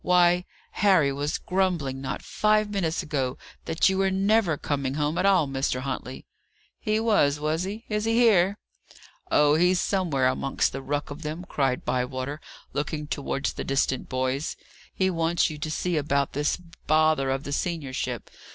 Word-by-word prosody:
"Why, 180 0 +4 0.3
Harry 185 -8 +3
was 145 +3 -2
grumbling, 175 -8 -1
not 135 - -4
five 215 0 +1
minutes 175 -5 -1
ago, 135 -4 -2 0.3
that 160 - +2
you 190 0 +1
were 195 0 +3
never 195 -3 +2
coming 140 -2 -2
home 150 +1 0
at 190 - +3
all, 185 -7 +4
Mr. 135 -1 -1
Huntley." 130 -1 -5 0.5
"He 215 -1 0
was, 175 -11 +3
was 155 +4 -1
he? 210 +4 -6
Is 210 0 -1
he 225 - +1
here?" 205 -5 +4 0.7
"Oh, 150 0 +4
he's 180 +3 +3
somewhere 170 -11 +1
amongst 135 +1 0
the 135 - -5
ruck 145 +1 -3
of 145 +3 -7
them," 160 +3 -5
cried 135 -3 0
Bywater, 130 +3 -2 0.3
looking 150 +1 -2
towards 140 -1 -2
the - - -5
distant 135 -1 0
boys. 130 +3 -1 0.3
"He 190 0 +1
wants 165 -1 +1
you 150 - -8
to 155 - -3
see 170 +2 -1
about 140 -1 0
this 145 +1 0 0.3
bother 155 -3 +3
of 135 +1 -1
the 145 - -6
seniorship. 145 -5 -3
155 Hz, 165 wpm, -26 LUFS, 140-185 Hz, 0.7 s, Why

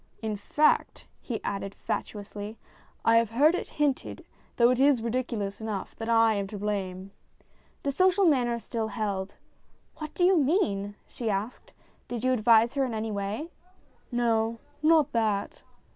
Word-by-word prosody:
"In 215 -1 -1
fact," 295 +9 +1
he 235 -4 -4
added 195 0 -4
fatuously, 205 +1 -5 0.2
" - - -31
I 230 0 +6
have 230 -2 +3
heard 285 +8 +4
it 360 - -3
hinted, 290 -3 -1 0.3
though 240 0 +5
it 255 - 0
is 270 -4 +4
ridiculous 230 -4 -2
enough, 215 -3 -4
that 225 0 -5
I 225 -1 +5
am 200 -1 -2
to 205 - -7
blame." 195 -2 -3 0.7
The 280 - 0
social 370 +6 +3
manner 245 -7 +3
still 230 -1 -3
held. 200 -3 -3 0.6
"What 310 -1 -7
do 355 - +1
you 370 +2 +6
mean? 205 - +1
" - - -38
she 235 -3 -2
asked. 205 +4 -3 0.2
" - - -36
Did 240 -1 -5
you 255 0 +3
advise 230 0 +4
her 275 -1 +1
in 245 -4 -2
any 220 0 -3
way? 205 +11 -4 0.2
" 370 - -34
" - - -37
No; 230 -1 +1 0.2
not 310 -2 +4
that." 215 -4 -1
230 Hz, 175 wpm, -28 LUFS, 205-265 Hz, 0.7 s, I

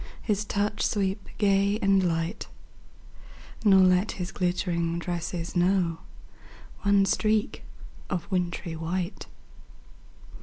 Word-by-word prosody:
His 210 -1 0
touch 210 +1 -1
sweep 195 0 -1
gay 200 0 +2
and 195 -3 +3
light; 165 +1 -2 1.2
Nor 195 -3 +6
let 185 +2 +3
his 180 -1 -5
glittering 170 -2 -1
tresses 170 0 -4
know 175 -2 +2 0.8
One 200 -1 +4
streak 215 +1 0 0.5
of 180 -4 -2
wintry 175 -2 -2
white. 175 +4 -4
185 Hz, 100 wpm, -27 LUFS, 175-200 Hz, 1.2 s, Nor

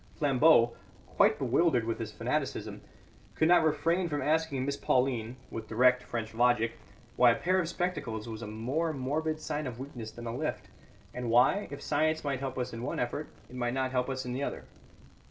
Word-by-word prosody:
Flambeau, 140 -4 +4 0.3
quite - - +3
bewildered 160 -10 +2
with 115 0 -2
this 110 -2 -4
fanaticism, 125 +7 -3 0.5
could 160 - +3
not 175 -1 +6
refrain 165 +3 +1
from 145 -2 -1
asking 150 -2 0
Miss 140 0 -1
Pauline 125 -4 0 0.2
(with 110 -1 -6
direct 125 +2 +4
French 115 -3 -5
logic) 120 -1 +3 0.5
why 125 - +7
a 115 - +4
pair 185 +7 +1
of 170 -3 -1
spectacles 145 - -3
was 110 -1 -6
a 115 - -5
more 130 +10 -2
morbid 155 +4 -2
sign 150 -2 -3
of 120 -2 -6
weakness 125 -4 -7
than 120 +2 -10
a 115 0 -4
lift, 155 +4 -3 0.4
and 125 -1 -4
why, 125 - +4
if 140 0 -8
science 155 +2 +1
might 140 -3 -1
help 130 -1 -4
us 125 -2 -3
in 115 - -5
the 120 - -4
one - - -3
effort, 125 +5 -3 0.2
it 125 - -12
might 120 0 -1
not 130 -1 0
help 125 0 0
us 130 -1 -3
in 125 - -3
the 130 - -3
other. - - -4
130 Hz, 200 wpm, -30 LUFS, 120-155 Hz, 0.5 s, why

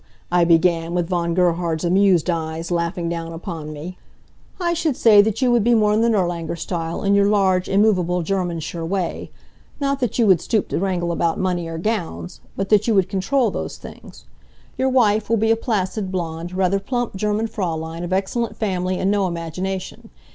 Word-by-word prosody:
I 175 -1 +4
began, 170 0 +2
with 175 -2 0
Von 170 -2 0
Gerhard's 175 -2 +1
amused 185 -1 +3
eyes 165 0 -3
laughing 170 0 -1
down 165 -1 -4
upon 165 -2 -6
me. 160 +5 -8 0.6
"I 345 -1 0
should 325 -5 -1
say 210 -3 +7
that 220 +5 -1
you 250 - +3
would 240 -3 +3
be 240 +1 +4
more 210 -1 +3
in 215 - +2
the 235 - +3
Nirlanger 175 -6 -1
style, 165 -1 -4
in 200 0 +2
your 200 0 +4
large, 190 -3 +2
immovable, 185 -4 +2
Germansure 170 -3 -3
way. 180 +1 -3 0.5
Not 275 -1 0
that 245 -5 -1
you 235 - +4
would 185 -5 +4
stoop 215 -3 -1
to - - -1
wrangle 180 -2 -1
about 170 +1 0
money 180 -3 -1
or 165 0 -5
gowns, 165 - -3 0.2
but 195 0 -2
that 210 0 +4
you 225 - +3
would 190 -1 +2
control 220 +5 +1
those - - -5
things. - - -13 0.5
Your 260 0 +1
wife 220 -5 +2
will 230 - +3
be 220 +1 +2
a - - +5
placid, 205 -4 -2
blond, 170 -1 -4
rather 190 +1 +1
plump 240 +2 -3
German 210 +3 0
Fraulein, 165 -5 -4
of 175 - -5
excellent 200 +5 -1
family 185 -3 -1
and 190 +2 +1
no 200 -2 +1
imagination. 180 +3 -5
185 Hz, 190 wpm, -21 LUFS, 170-210 Hz, 0.6 s, say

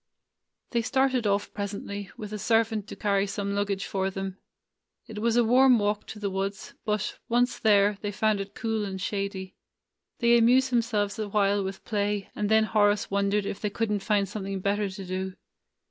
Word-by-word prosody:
They 235 - +1
started 260 -1 +1
off 200 0 0
presently, 200 -1 -5
with 215 -1 -7
a 210 - -4
servant 225 -1 +1
to - - -8
carry 200 -1 +1
some 200 0 -3
luggage 200 -1 -1
for 190 -1 -1
them. 195 0 -5 0.7
It 215 -1 -7
was 230 +1 +1
a 240 - +5
warm 250 +2 +6
walk 210 0 -1
to - - -8
the 205 -2 -3
woods, 195 +1 -4
but, 210 -1 -1
once 245 +1 +2
there, 205 -1 +4
they 205 - -2
found 215 0 +1
it 195 +1 -6
cool 225 -1 -1
and 190 -2 -4
shady. 195 -1 -3 0.6
They 235 0 +5
amused 255 +3 +4
them 240 -1 +4
selves 210 -2 -2
awhile 205 -1 +1
with 190 0 -6
play, 205 -2 -1
and 210 -1 -1
then 220 0 +5
Horace 210 -2 +2
won 200 0 +1
dered 205 0 +1
if 200 - -4
they 210 - 0
could 220 +1 -2
n't 205 -1 0
find 200 -1 +1
something 195 0 -4
better 200 +1 0
to 190 0 -8
do. 185 +1 -4
205 Hz, 190 wpm, -27 LUFS, 200-220 Hz, 0.7 s, warm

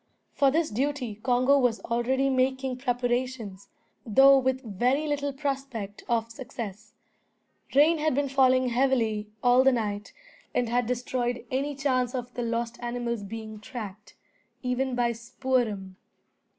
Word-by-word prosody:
For 275 - +4
this 315 +3 +1
duty 260 0 -1
Congo 255 +3 +3
was 245 -3 +2
already 255 +3 0
making 260 0 0
preparations, 245 -5 -2 0.3
though 270 +5 +7
with 260 0 0
very 245 +7 0
little 285 -1 -1
prospect 270 -7 -4
of 230 -1 0
success. 215 -4 -8 0.8
Rain 310 +3 +5
had 310 -3 +1
been 285 0 +1
falling 260 -1 +3
heavily 235 -4 +1
all 250 +1 +6
the 270 - +6
night, 210 -4 -2 0.4
and 245 - +2
had 245 0 +1
destroyed 245 0 -2
any 280 +3 -1
chance 260 -2 0
of 245 -1 -5
the 245 - -4
lost 235 0 -2
animals 240 -2 -3
being 220 +1 -7
tracked, 215 -4 -8 0.5
even 250 +1 -1
by 240 -1 +2
Spoor'em. 230 -5 -2
245 Hz, 135 wpm, -27 LUFS, 230-265 Hz, 0.8 s, though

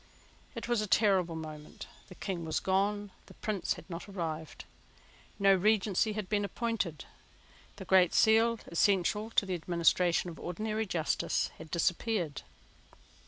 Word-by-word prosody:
It 230 - -5
was 240 -2 +1
a 215 - -2
terrible 190 -5 +3
moment. 155 -1 -8 0.2
The 185 - -12
King 180 -3 -4
was 160 -1 -1
gone. 200 +2 0 0.2
The - - -15
Prince 205 -5 -2
had - - -12
not 175 +2 -7
arrived. 160 -5 -5 0.7
No 195 -1 +5
Regency 210 +2 +2
had 210 -2 -4
been 205 0 0
appointed. 200 - -2 0.7
The - - -9
Great 185 -2 +4
Seal, 225 +1 +4
essential 200 +4 +1
to 215 - +2
the 190 - -3
administration 175 +1 +2
of 165 - -12
ordinary 215 +4 -3
justice, 165 -4 0
had 160 - -10
disappeared. 175 - -1
190 Hz, 140 wpm, -31 LUFS, 170-215 Hz, 0.7 s, No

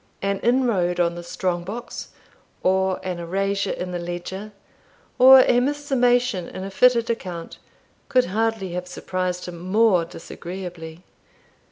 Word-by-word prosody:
An 200 0 0
inroad 230 -8 +1
on 170 -1 +2
the 175 - -7
strong 175 0 -2
box, 225 +7 -7 0.6
or 190 0 +2
an 180 -2 -3
erasure 195 +3 -1
in 180 0 -4
the 175 - -3
ledger, 175 +4 -6 0.7
or 260 +1 +10
a 245 -1 +4
mis 285 +4 0
summation 245 - +2
in 185 - -7
a 195 - -6
fitted 240 +1 +4
account, 180 -7 -6 0.5
could 255 -2 +4
hardly 220 -1 -1
have 180 +1 -4
surprised 180 0 -3
him 175 -1 -7
more 190 0 +3
disagreeably. 170 0 -8
190 Hz, 140 wpm, -23 LUFS, 175-230 Hz, 0.7 s, or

